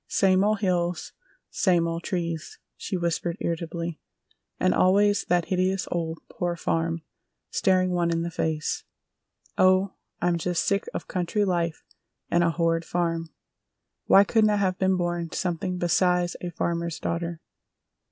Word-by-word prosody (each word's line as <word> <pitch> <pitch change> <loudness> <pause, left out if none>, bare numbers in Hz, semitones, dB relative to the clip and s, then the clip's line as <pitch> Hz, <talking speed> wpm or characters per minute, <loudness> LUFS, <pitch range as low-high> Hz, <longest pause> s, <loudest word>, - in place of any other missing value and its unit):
"Same 190 0 +3
old 210 0 +1
hills! 175 -3 0 0.4
Same 175 -3 +2
old 165 0 -3
trees!" 170 -4 -3 0.2
she 190 - -3
whispered 170 0 -1
irritably. 170 0 -3 0.6
"And 90 - +3
always 205 +2 +3
that 175 -1 +1
hideous 185 +1 0
old 165 -1 -2
Poor 175 -1 -2
Farm 165 -1 -1 0.5
staring 185 -1 +2
one 175 -1 +1
in 165 0 0
the 170 - -3
face! 160 -2 -2 0.8
Oh, 185 +1 +4 0.3
I'm 175 -1 +1
just 175 +1 0
sick 200 0 0
of - - -4
country 185 +3 0
life 170 -3 -1 0.5
and 175 0 +4
a 170 - +3
horrid 165 0 +1
farm! 165 -1 -1 0.8
Why 195 - +8
couldn't 215 +1 +3
I 210 - +3
have 190 -2 0
been 190 0 +2
born 175 -1 -2
something 180 0 -2
besides 180 0 +2
a 180 - -3
farmer's 170 0 -2
daughter?" 170 0 -3
175 Hz, 140 wpm, -26 LUFS, 170-185 Hz, 0.8 s, Why